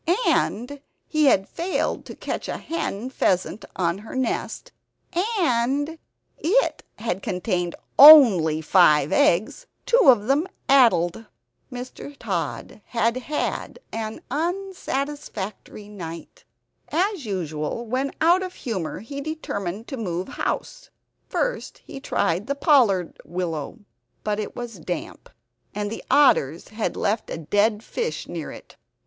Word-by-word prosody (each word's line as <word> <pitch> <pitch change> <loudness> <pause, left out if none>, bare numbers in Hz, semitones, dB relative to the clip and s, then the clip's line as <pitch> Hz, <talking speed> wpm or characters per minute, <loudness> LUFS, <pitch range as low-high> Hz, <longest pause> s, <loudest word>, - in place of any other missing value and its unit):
And 270 +6 0 0.2
he 310 -1 +1
had 195 -8 +4
failed 360 +2 -2
to - - -8
catch - - -5
a - - -3
hen 255 -7 -4
pheasant 190 -2 0
on 175 0 0
her 220 +5 -10
nest; 260 - -2 0.7
and 285 +1 0 0.4
it 425 +11 +1
had 195 -4 -3
contained 180 -2 -2 0.2
only 215 - +9
five 155 -4 +4
eggs, 215 - +2 0.2
two - - +4
of 240 -7 +6
them 285 +8 +2 0.2
addled. 225 -7 +4 0.4
Mr. 255 +3 -8
Tod 200 -1 -4
had 230 0 0
had 295 +4 -3
an 220 -1 -5
unsatisfactory 290 - -4
night. 170 -6 -9 0.5
As 360 - 0
usual, 170 +2 -3
when 260 +4 -1
out 345 +4 +4
of 370 -1 -5
humor, 190 -11 -4
he 280 +6 -7
determined 225 - -4
to 270 - -5
move 185 -5 -3
house. - - -4 0.4
First - - -2
he - - -8
tried 190 - -1
the 280 - -1
pollard 240 - +3
willow, 170 -1 -4 0.5
but 210 0 -1
it 215 - -5
was 235 -5 -7
damp; 175 +2 -6 0.5
and 205 0 -2
the 225 - -6
otters 255 - +3
had 215 +1 -3
left 210 +2 -1
a - - -4
dead 205 +7 +1
fish 470 - -4
near - - -6
it. - - -13
Mr. - - -51
230 Hz, 130 wpm, -24 LUFS, 185-285 Hz, 0.7 s, only